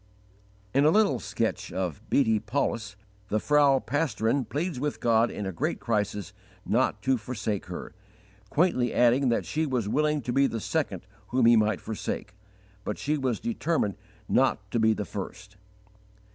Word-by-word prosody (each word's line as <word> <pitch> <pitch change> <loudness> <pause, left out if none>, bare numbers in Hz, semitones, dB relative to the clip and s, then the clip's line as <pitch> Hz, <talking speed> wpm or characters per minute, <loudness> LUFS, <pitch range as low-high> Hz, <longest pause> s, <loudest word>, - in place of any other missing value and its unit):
In 140 - +4
a 150 - +6
little 170 - +3
sketch 110 +1 -2
of 95 +1 -3
Beate 110 -5 +2
Paulus, 110 -4 -1 0.3
the 110 - 0
Frau 145 +1 +4
Pastorin 135 -2 0
pleads 155 +3 -3
with 145 +2 -2
God 115 0 +3
in 105 - -5
a 95 - -2
great 80 - -2
crisis 105 -4 -2 0.3
not - - +1
to 130 -2 +2
forsake 105 -4 -3
her, 90 - -7 0.6
quaintly 145 - +2
adding 125 +2 +4
that 115 - +1
she 155 +1 -1
was 125 -6 -1
"willing 150 +4 +1
to 120 - -2
be 140 +1 +4
the 115 - -3
second 110 - -2 0.2
whom 125 +1 +2
He 120 0 +7
might 110 -2 +2
forsake," 110 0 -4 0.5
but 105 - -3
she 150 +2 0
was 130 -5 -1
"determined 170 - -1 0.3
not 110 -6 +1
to 120 - +1
be 110 0 +4
the 105 - -3
_first." 105 +2 -7
120 Hz, 160 wpm, -27 LUFS, 105-140 Hz, 0.6 s, He